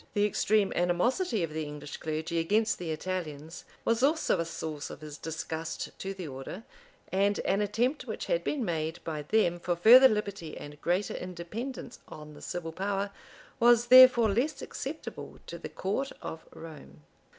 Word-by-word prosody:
The 205 Hz, 0 st, +3 dB
extreme 210 Hz, 0 st, +2 dB
animosity 205 Hz, -, +1 dB
of 160 Hz, -2 st, -3 dB
the 160 Hz, 0 st, -2 dB
English 150 Hz, 0 st, -7 dB
clergy 160 Hz, +2 st, -2 dB
against 215 Hz, +7 st, +1 dB
the 175 Hz, -2 st, -4 dB
Italians 160 Hz, -2 st, -5 dB, 0.2 s
was 230 Hz, +1 st, +2 dB
also 300 Hz, -, +2 dB
a 165 Hz, -, 0 dB
source 155 Hz, -2 st, -5 dB
of -, -, -10 dB
his 150 Hz, -1 st, -8 dB
disgust 160 Hz, 0 st, -5 dB
to 195 Hz, 0 st, -4 dB
the 185 Hz, -4 st, -6 dB
order; 135 Hz, +9 st, -7 dB, 0.5 s
and 200 Hz, +2 st, +2 dB
an 200 Hz, -, +1 dB
attempt 235 Hz, +8 st, 0 dB
which -, -, -4 dB
had -, -, 0 dB
been 275 Hz, -6 st, -1 dB
made 160 Hz, -2 st, -2 dB
by 155 Hz, -2 st, -4 dB
them 175 Hz, +2 st, +1 dB
for 175 Hz, 0 st, -1 dB
further 240 Hz, +9 st, +9 dB
liberty 200 Hz, -6 st, -3 dB
and 145 Hz, 0 st, -10 dB
greater 180 Hz, +4 st, 0 dB
independence 210 Hz, +9 st, -6 dB
on 150 Hz, -1 st, -10 dB
the -, -, -13 dB
civil 165 Hz, -2 st, -5 dB
power, 195 Hz, +3 st, -2 dB, 0.5 s
was 240 Hz, 0 st, +5 dB
therefore 255 Hz, -4 st, +9 dB
less 270 Hz, +7 st, -1 dB
acceptable 300 Hz, +4 st, -7 dB
to -, -, -8 dB
the -, -, -7 dB
court 215 Hz, +9 st, -2 dB
of 160 Hz, 0 st, -7 dB
Rome. 75 Hz, -, -12 dB
185 Hz, 165 wpm, -29 LUFS, 160-225 Hz, 0.5 s, further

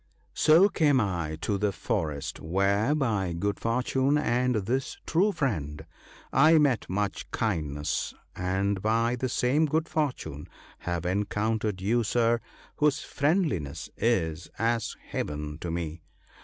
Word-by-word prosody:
* -, -, -38 dB
So 165 Hz, +6 st, +8 dB
came 150 Hz, -8 st, +3 dB
I 85 Hz, -7 st, -1 dB
to 100 Hz, +1 st, -1 dB
the 105 Hz, 0 st, +1 dB
forest, 80 Hz, -, -3 dB
where, 100 Hz, -, +1 dB
by 105 Hz, -, 0 dB
good 100 Hz, +4 st, -2 dB
fortune 130 Hz, +4 st, +1 dB
and 125 Hz, -3 st, +1 dB
this 120 Hz, +6 st, -1 dB
true 190 Hz, +6 st, +3 dB
friend, 80 Hz, -, -2 dB, 0.5 s
I 155 Hz, +4 st, +6 dB
met 140 Hz, -6 st, +2 dB
much 100 Hz, +1 st, -2 dB
kindness; 75 Hz, -8 st, -1 dB, 0.2 s
and 95 Hz, +2 st, -1 dB
by 115 Hz, +3 st, +2 dB
the 130 Hz, +1 st, -2 dB
same 135 Hz, +6 st, +2 dB
good 160 Hz, +2 st, 0 dB
fortune 125 Hz, -, -3 dB, 0.3 s
have 85 Hz, -1 st, -3 dB
encountered 105 Hz, +1 st, -1 dB
you, 115 Hz, +5 st, +2 dB
Sir, 115 Hz, +1 st, +2 dB, 0.4 s
whose 150 Hz, -1 st, +2 dB
friend 160 Hz, +7 st, +1 dB
liness 75 Hz, -, -4 dB
is 85 Hz, -8 st, 0 dB
as 115 Hz, 0 st, 0 dB, 0.2 s
Heaven 75 Hz, +1 st, -4 dB
to 85 Hz, -, -5 dB
me. 85 Hz, -1 st, -4 dB
105 Hz, 135 wpm, -28 LUFS, 85-130 Hz, 0.5 s, So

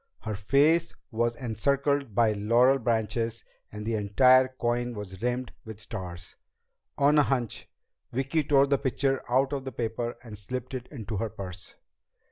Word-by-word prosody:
Her 110 Hz, -, -4 dB
face 145 Hz, +11 st, +2 dB, 0.2 s
was 120 Hz, +1 st, 0 dB
encircled 140 Hz, +1 st, 0 dB
by 115 Hz, -2 st, +4 dB
laurel 120 Hz, +6 st, +3 dB
branches 115 Hz, 0 st, -1 dB, 0.3 s
and 105 Hz, 0 st, -7 dB
the 115 Hz, -, -1 dB
entire 125 Hz, +5 st, +5 dB
coin 120 Hz, -1 st, -2 dB
was 95 Hz, -2 st, -8 dB
rimmed 125 Hz, +1 st, -2 dB
with 110 Hz, -2 st, -9 dB
stars. 90 Hz, -6 st, -7 dB, 0.6 s
On 145 Hz, +2 st, +4 dB
a -, -, +8 dB
hunch, 125 Hz, -5 st, -2 dB, 0.4 s
Vicki 135 Hz, +5 st, 0 dB
tore 140 Hz, -1 st, +4 dB
the 140 Hz, -1 st, +1 dB
picture 135 Hz, 0 st, 0 dB
out 135 Hz, +3 st, +2 dB
of 135 Hz, -2 st, -2 dB
the 130 Hz, -, -5 dB
paper 115 Hz, 0 st, -3 dB
and 110 Hz, -4 st, -9 dB
slipped 125 Hz, +5 st, -5 dB
it 125 Hz, -1 st, -5 dB
into 115 Hz, -6 st, -6 dB
her 110 Hz, +4 st, -2 dB
purse. 95 Hz, -3 st, -9 dB
120 Hz, 155 wpm, -28 LUFS, 110-135 Hz, 0.6 s, a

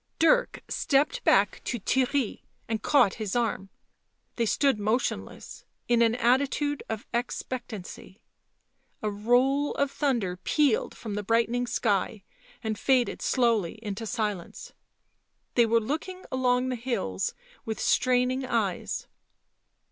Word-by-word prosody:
Dirk -, -, +3 dB
stepped 300 Hz, -, +1 dB
back -, -, +3 dB
to 240 Hz, -, -2 dB
Theirry 260 Hz, +3 st, 0 dB, 0.3 s
and 220 Hz, -1 st, -2 dB
caught 280 Hz, -10 st, +4 dB
his 210 Hz, -1 st, -2 dB
arm; 220 Hz, -5 st, -1 dB, 0.7 s
they 230 Hz, -2 st, 0 dB
stood 275 Hz, 0 st, +2 dB
motionless, 215 Hz, +5 st, -2 dB, 0.2 s
in 235 Hz, -1 st, +3 dB
an 230 Hz, 0 st, +4 dB
attitude 275 Hz, +4 st, +1 dB
of 220 Hz, -1 st, -4 dB
expectancy. 235 Hz, -5 st, -5 dB, 0.8 s
A 215 Hz, -, 0 dB
roll 250 Hz, +7 st, +2 dB
of 280 Hz, -1 st, 0 dB
thunder 235 Hz, -13 st, 0 dB
pealed 275 Hz, -, +1 dB
from 220 Hz, -3 st, -6 dB
the 210 Hz, -, -2 dB
brightening 230 Hz, +3 st, +1 dB
sky 215 Hz, -3 st, 0 dB, 0.4 s
and 220 Hz, -2 st, -2 dB
faded 255 Hz, -3 st, +2 dB
slowly 230 Hz, -9 st, +1 dB
into 210 Hz, +1 st, -4 dB
silence; 210 Hz, -6 st, -4 dB, 0.8 s
they 235 Hz, -2 st, +4 dB
were 230 Hz, +1 st, +4 dB
looking 320 Hz, -, -4 dB
along 255 Hz, 0 st, +1 dB
the 255 Hz, -, -1 dB
hills 230 Hz, -, -2 dB, 0.3 s
with 220 Hz, -1 st, -4 dB
straining 255 Hz, +1 st, +2 dB
eyes. 225 Hz, -7 st, -1 dB
240 Hz, 120 wpm, -27 LUFS, 215-260 Hz, 0.8 s, caught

